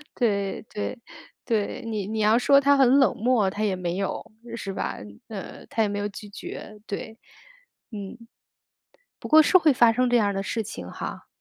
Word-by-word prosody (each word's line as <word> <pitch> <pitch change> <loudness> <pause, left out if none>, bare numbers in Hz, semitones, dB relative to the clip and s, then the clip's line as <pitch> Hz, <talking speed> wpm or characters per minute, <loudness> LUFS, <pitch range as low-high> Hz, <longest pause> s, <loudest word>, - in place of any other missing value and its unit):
对， 200 -5 0
对， 210 +4 -4 0.5
对， 215 -4 -1
你 215 -4 -3
你 220 +1 -3
要 215 +2 +4
说 275 +2 +5
他 280 0 +4
很 270 0 +5
冷 265 -8 +4
漠， 230 -3 +2
他 205 +3 -3
也 200 -3 +1
没 180 -1 -3
有， 195 +1 -3 0.2
是 195 -4 -5
吧？ - - -3 0.3
呃， 200 -4 -8
他 225 - -1
也 210 - +2
没 205 0 -3
有 205 - -1
拒 210 0 -10
绝， 210 +1 -9
对， 220 +2 -6 0.7
嗯。 205 0 -7 1.0
不 - - -6
过 315 0 +8
是 370 - +6
会 320 -5 +4
发 235 -2 +5
生 250 +2 +1
这 245 - +3
样 205 -4 +3
的 195 - -2
事 225 +3 -2
情 90 - -8
哈。 - - -7
215 Hz, 200 characters per minute, -25 LUFS, 200-245 Hz, 1.0 s, 过